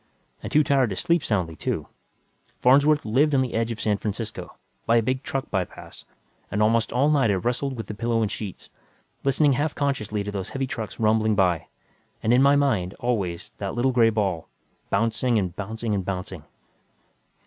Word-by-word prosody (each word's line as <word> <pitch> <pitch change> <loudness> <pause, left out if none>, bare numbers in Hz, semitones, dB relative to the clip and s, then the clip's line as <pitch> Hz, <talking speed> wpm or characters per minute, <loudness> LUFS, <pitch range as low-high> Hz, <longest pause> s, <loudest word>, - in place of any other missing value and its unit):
And - - -6
too 150 - +5
tired 135 -4 +2
to 95 - -3
sleep 170 - +1
soundly, 90 - -1
too. 70 - -3 0.7
Farnsworth 145 +4 +4
lived 140 +7 +3
on 130 - +4
the 125 - -4
edge 115 0 0
of 115 -2 -5
San 105 -2 0
Francisco, 105 +1 -5 0.3
by 115 - +4
a 115 - +5
big 130 +3 -1
truck 135 -1 -4
by 95 -3 +1
pass, - - -13 0.4
and 105 - -2
almost 115 +1 +2
all 140 +5 +3
night 135 -6 +3
I 100 - +3
wrestled 125 +7 -2
with 115 - -5
the 105 - -6
pillow 115 +1 0
and 105 - -1
sheets, 105 -4 -7 0.5
listening 140 +2 +3
half 145 +3 0
consciously 110 -8 -1
to 105 - -4
those 95 -2 -4
heavy 135 0 -2
trucks 115 -4 -6
rumbling 110 -1 +2
by, 90 -4 +1 0.6
and 115 - +3
in 125 - +5
my 140 +1 +5
mind, 110 -11 +1
always, 100 -8 -2
that 100 -1 -4
little 125 +2 +2
gray 120 -2 +4
ball, 100 -7 -1 0.4
bouncing 115 +3 +1
and 90 -4 -1
bouncing 110 +2 -3
and 100 -2 -1
bouncing.... 90 -3 -5
115 Hz, 190 wpm, -24 LUFS, 100-130 Hz, 0.7 s, too